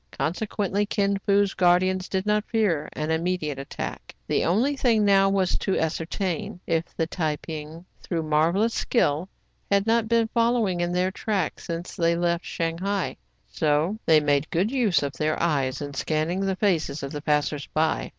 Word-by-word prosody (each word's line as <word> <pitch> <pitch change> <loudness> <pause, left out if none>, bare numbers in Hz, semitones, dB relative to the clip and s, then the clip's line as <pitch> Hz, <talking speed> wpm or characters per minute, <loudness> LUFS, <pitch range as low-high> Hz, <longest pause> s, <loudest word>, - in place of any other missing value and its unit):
Consequently, 200 +3 -1
Kin 200 -1 0
Fo's 200 0 +3
guardians 185 +1 +2
did 190 0 -1
not 210 0 +2
fear 190 -10 +1
an 155 +1 -2
immediate 160 -4 -1
attack. 135 - -6
The - - +1
only 230 - +2
thing 230 -6 +2
now 195 -1 +5
was 195 -2 +1
to 195 - 0
ascertain 180 +5 -2
if 165 0 0
the 165 - +1
Tai 160 -2 -1
ping, 155 +2 -8 0.2
through 165 -3 -2
marvellous 165 +9 +2
skill, 170 - +1 0.4
had 200 0 +3
not 225 0 +2
been 230 -1 +3
following 230 -6 +1
in 175 0 0
their 180 +1 +1
track 200 -2 -2
since 170 0 -6
they 170 -1 +2
left 170 0 0
.Shanghai, 180 +3 -2 0.3
so 155 +7 0
they 160 -1 +7
made 145 0 +1
good 190 +7 0
use 230 - +2
of 140 -1 -3
their 155 +4 -1
eyes 140 -5 0
in 145 0 -6
scanning 155 +6 -1
the 195 -1 0
faces 165 -8 0
of 140 - -4
the 150 - -5
passers 150 -1 0
by. 160 +1 0
175 Hz, 170 wpm, -25 LUFS, 155-200 Hz, 0.4 s, they